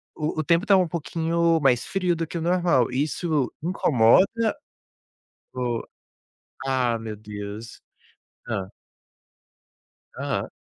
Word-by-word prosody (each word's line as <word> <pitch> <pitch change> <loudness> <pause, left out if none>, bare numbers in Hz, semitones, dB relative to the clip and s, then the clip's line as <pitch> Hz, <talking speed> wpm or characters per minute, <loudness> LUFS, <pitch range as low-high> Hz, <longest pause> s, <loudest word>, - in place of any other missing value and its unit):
o 150 - -2
o - - 0
o - - -4
tempo 170 +5 +2
tá 200 -2 +6
um 185 -2 +3
pouquinho 165 0 0
mais 125 -4 +3
frio 180 -3 0
do 165 0 -3
que 170 - -5
o - - -3
normal, 170 -8 +2
isso 145 +1 0
incomoda 185 - +3 1.0
ou 125 -2 -2 0.8
Ah 125 -3 +1
meu 110 -1 -6
Deus, 105 +1 -8 0.7
hã. 95 -1 -3 1.5
Aham. - - -2
155 Hz, 120 wpm, -24 LUFS, 120-170 Hz, 1.5 s, tá